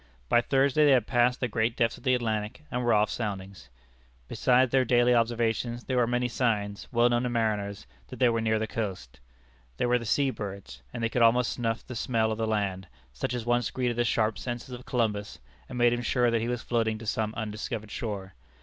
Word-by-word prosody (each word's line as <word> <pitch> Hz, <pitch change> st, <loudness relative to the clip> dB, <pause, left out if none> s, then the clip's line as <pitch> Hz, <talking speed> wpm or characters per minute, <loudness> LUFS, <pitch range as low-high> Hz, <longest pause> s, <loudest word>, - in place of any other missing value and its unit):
By 120 Hz, -, +5 dB
Thursday 135 Hz, +4 st, +2 dB
they 145 Hz, -2 st, +6 dB
had 125 Hz, -5 st, +3 dB
passed 120 Hz, +1 st, +2 dB
the 125 Hz, -, +1 dB
great 115 Hz, +1 st, 0 dB
depths 115 Hz, -1 st, +1 dB
of -, -, -15 dB
the 130 Hz, -2 st, +3 dB
Atlantic, 110 Hz, +2 st, -3 dB
and 125 Hz, 0 st, -1 dB
were 120 Hz, -, +2 dB
off 105 Hz, -1 st, +3 dB
soundings. 95 Hz, -, -5 dB, 0.6 s
Besides 125 Hz, -, +3 dB
their 135 Hz, -1 st, +4 dB
daily 125 Hz, 0 st, +4 dB
observations, 120 Hz, 0 st, 0 dB
there 130 Hz, -, -2 dB
were 120 Hz, -1 st, +3 dB
many 125 Hz, +1 st, 0 dB
signs, 105 Hz, -5 st, -1 dB
well 120 Hz, -1 st, +4 dB
known 120 Hz, 0 st, +2 dB
to 125 Hz, -, -1 dB
mariners, 105 Hz, -4 st, -1 dB, 0.2 s
that -, -, -9 dB
they 125 Hz, -, +4 dB
were 115 Hz, -1 st, +1 dB
near 110 Hz, 0 st, +1 dB
the 110 Hz, -, -1 dB
coast. 95 Hz, -, -5 dB, 0.6 s
There -, -, +1 dB
were 125 Hz, 0 st, +3 dB
the 115 Hz, -, -7 dB
sea 135 Hz, +3 st, +2 dB
birds, 100 Hz, -, -7 dB
and 115 Hz, -, -5 dB
they 115 Hz, -, +1 dB
could 120 Hz, -, -1 dB
almost 120 Hz, +1 st, +4 dB
snuff 115 Hz, -2 st, -2 dB
the -, -, -7 dB
smell 115 Hz, -1 st, 0 dB
of 110 Hz, -, -3 dB
the 110 Hz, -, 0 dB
land, 100 Hz, -3 st, -1 dB, 0.3 s
such 90 Hz, -, -3 dB
as 120 Hz, -2 st, -4 dB
once 120 Hz, -1 st, +1 dB
greeted 125 Hz, -2 st, -1 dB
the 120 Hz, -, +2 dB
sharp 110 Hz, -1 st, 0 dB
senses 120 Hz, 0 st, -5 dB
of 125 Hz, 0 st, -9 dB
Columbus, 105 Hz, -4 st, -1 dB, 0.3 s
and -, -, -6 dB
made 120 Hz, 0 st, +4 dB
him 120 Hz, -, -2 dB
sure 120 Hz, 0 st, +2 dB
that 115 Hz, -1 st, +1 dB
he 115 Hz, -, -2 dB
was 120 Hz, -1 st, -3 dB
floating 115 Hz, -2 st, 0 dB
to 115 Hz, -, -10 dB
some 110 Hz, 0 st, -1 dB
undiscovered 110 Hz, 0 st, -5 dB
shore. 100 Hz, -4 st, -5 dB
115 Hz, 220 wpm, -28 LUFS, 110-125 Hz, 0.6 s, they